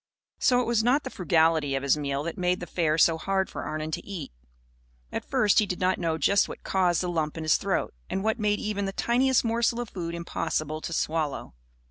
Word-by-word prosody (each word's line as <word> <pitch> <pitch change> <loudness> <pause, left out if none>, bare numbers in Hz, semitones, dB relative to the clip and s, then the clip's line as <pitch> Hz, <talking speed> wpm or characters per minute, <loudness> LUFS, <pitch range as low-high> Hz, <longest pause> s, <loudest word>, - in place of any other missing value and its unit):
So 250 -2 +4
it - - -2
was 230 -1 +1
not 265 +5 +3
the 260 - -6
frugality 160 -5 +2
of 135 - -2
his 140 - +3
meal 140 -1 -2
that 170 +1 -4
made 180 0 0
the 175 - -5
fare 160 -3 0
so 165 0 +4
hard 190 +2 -1
for - - -5
Arnon 155 +1 -4
to - - -3
eat. 190 -7 -7 0.8
At - - -3
first 205 -1 +4
he 210 - +2
did 180 - -3
not 185 0 +1
know 165 -2 0
just 200 +6 +3
what - - -9
caused 180 -3 +1
the 180 - -2
lump 160 -3 -2
in 160 - -4
his 155 - +4
throat - - -1 0.2
and 190 - -2
what 220 +2 0
made 210 -1 +1
even 205 -1 -2
the 195 - -3
tiniest 250 +3 +2
morsel 230 +1 +1
of 240 -3 -4
food 170 -2 -4
impossible 155 -2 -3
to - - -5
swallow. 155 - -2
180 Hz, 225 wpm, -27 LUFS, 160-210 Hz, 0.8 s, So